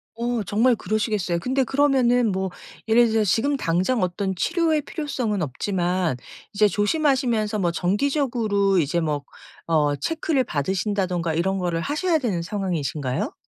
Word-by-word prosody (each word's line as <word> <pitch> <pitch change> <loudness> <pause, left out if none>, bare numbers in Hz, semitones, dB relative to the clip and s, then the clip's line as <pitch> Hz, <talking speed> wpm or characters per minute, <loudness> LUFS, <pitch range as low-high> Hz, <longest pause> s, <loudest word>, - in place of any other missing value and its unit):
어 235 -1 -1
정말 230 +6 +2
그러시겠어요. 210 -5 -1
근데 260 +7 0
그러면은 250 -4 +2
뭐 190 0 -2 0.4
예를 235 +2 +5
들어서 220 0 +2
지금 275 +10 +1
당장 185 +4 0
어떤 190 +2 -2
치료의 325 - +1
필요성은 260 - -3
없지만 175 +2 -1 0.4
이제 210 +1 +4
조심하시면서 230 - +1
뭐 175 -3 +1
정기적으로 210 - +1
이제 160 +2 0
뭐 150 -3 -1 0.4
어 150 -3 +2
체크를 310 - 0
받으신다든가 185 - -1
이런 190 +4 0
거를 175 -3 -1
하셔야 320 - 0
되는 220 - -1
상황이신가요? 160 -8 -2
205 Hz, 350 characters per minute, -23 LUFS, 175-250 Hz, 0.4 s, 예를